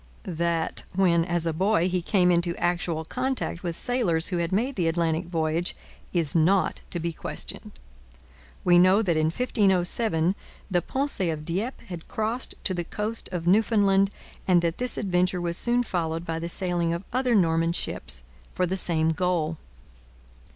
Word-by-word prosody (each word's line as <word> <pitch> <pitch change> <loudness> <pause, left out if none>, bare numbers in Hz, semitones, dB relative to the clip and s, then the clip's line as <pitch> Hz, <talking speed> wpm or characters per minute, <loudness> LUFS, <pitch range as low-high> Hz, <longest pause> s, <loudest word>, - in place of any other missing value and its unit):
That, 170 -1 0
when 170 -3 +3
a 170 -2 +2
boy, 185 +1 +2
he 180 -1 -1
came 180 0 +3
into 170 0 +1
actual 175 -2 -1
contact 255 -5 -2
with 170 -2 -3
sailors 195 -10 +1
who 180 - -1
had 170 0 -1
made 240 +8 0
the 175 -4 0
Atlantic 165 0 0
voyage 165 0 -1 0.4
is 165 -5 +1
not 180 +4 +3
to 175 - -4
be 170 0 -3
questioned. - - -5 0.9
We 175 -1 +5
know 185 +4 +5
that 175 -5 +1
in 155 0 +2
1507 190 -3 +1 0.4
the 175 -1 +2
Pensee 260 - -1
of 155 -1 -4
Dieppe 205 - -3
had 175 -6 -8
crossed 225 +4 -1
to 185 - 0
the 175 -1 -2
coast 210 +6 -3
of 175 -2 -4
Newfoundland 195 0 +3 0.4
and 175 -2 +4
that 165 0 -1
this 250 -1 +1
adventure 180 -2 +1
was 170 -1 -2
soon 240 +5 +2
followed 165 -5 -2
by 165 -1 -3
the 170 +1 -4
sailing 175 -2 -1
of 170 +3 -5
other 250 -2 +2
Norman 165 -3 +2
ships 65 - -1 0.3
for 185 - +1
the 185 +2 -2
same 160 -3 +1
goal. 165 -2 -1
175 Hz, 165 wpm, -26 LUFS, 165-195 Hz, 0.9 s, We